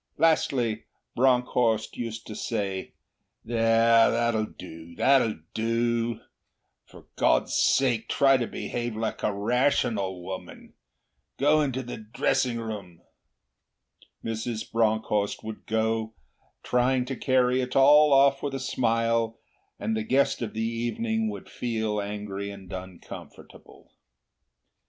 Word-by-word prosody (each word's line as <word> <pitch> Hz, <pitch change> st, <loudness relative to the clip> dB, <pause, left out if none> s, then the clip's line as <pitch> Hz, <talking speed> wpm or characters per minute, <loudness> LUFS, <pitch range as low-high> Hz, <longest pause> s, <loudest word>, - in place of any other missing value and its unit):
Lastly, 130 Hz, -8 st, +1 dB, 0.3 s
Bronckhorst 125 Hz, -3 st, +2 dB
used 115 Hz, -1 st, -5 dB
to 110 Hz, -, -7 dB
say, 100 Hz, -5 st, -3 dB, 0.5 s
'There! 115 Hz, 0 st, +4 dB
That'll 115 Hz, -2 st, +1 dB
do, 85 Hz, -1 st, -11 dB
that'll 115 Hz, -9 st, +3 dB
do. 115 Hz, 0 st, 0 dB, 0.7 s
For -, -, -16 dB
God's -, -, +2 dB
sake 125 Hz, -5 st, +2 dB
try 135 Hz, -1 st, +4 dB
to 120 Hz, -2 st, -2 dB
behave 120 Hz, -2 st, -4 dB
like 110 Hz, 0 st, -3 dB
a -, -, +1 dB
rational 105 Hz, -4 st, 0 dB
woman. 95 Hz, +1 st, -8 dB, 0.6 s
Go 150 Hz, +3 st, +4 dB
into 130 Hz, -3 st, -1 dB
the 120 Hz, -, -7 dB
drawing 115 Hz, +3 st, 0 dB
room.' 105 Hz, -7 st, -7 dB, 1.2 s
Mrs. 115 Hz, 0 st, -4 dB
Bronckhorst 110 Hz, -2 st, 0 dB
would 110 Hz, 0 st, -8 dB
go, 110 Hz, 0 st, -1 dB, 0.5 s
trying 125 Hz, +1 st, +1 dB
to 135 Hz, +1 st, -4 dB
carry 130 Hz, 0 st, +2 dB
it 125 Hz, 0 st, -4 dB
all 145 Hz, +2 st, +7 dB
off 140 Hz, 0 st, +5 dB
with 140 Hz, -2 st, -3 dB
a -, -, -3 dB
smile; 115 Hz, -2 st, 0 dB, 0.4 s
and 110 Hz, -, -1 dB
the 110 Hz, -, -1 dB
guest 130 Hz, +5 st, +1 dB
of 115 Hz, -3 st, -4 dB
the 110 Hz, -, -1 dB
evening 220 Hz, -, -1 dB
would -, -, -8 dB
feel 110 Hz, -3 st, -2 dB
angry 100 Hz, -1 st, -5 dB
and 95 Hz, -2 st, -10 dB
uncomfortable. 95 Hz, -1 st, -11 dB
115 Hz, 120 wpm, -26 LUFS, 110-125 Hz, 1.2 s, all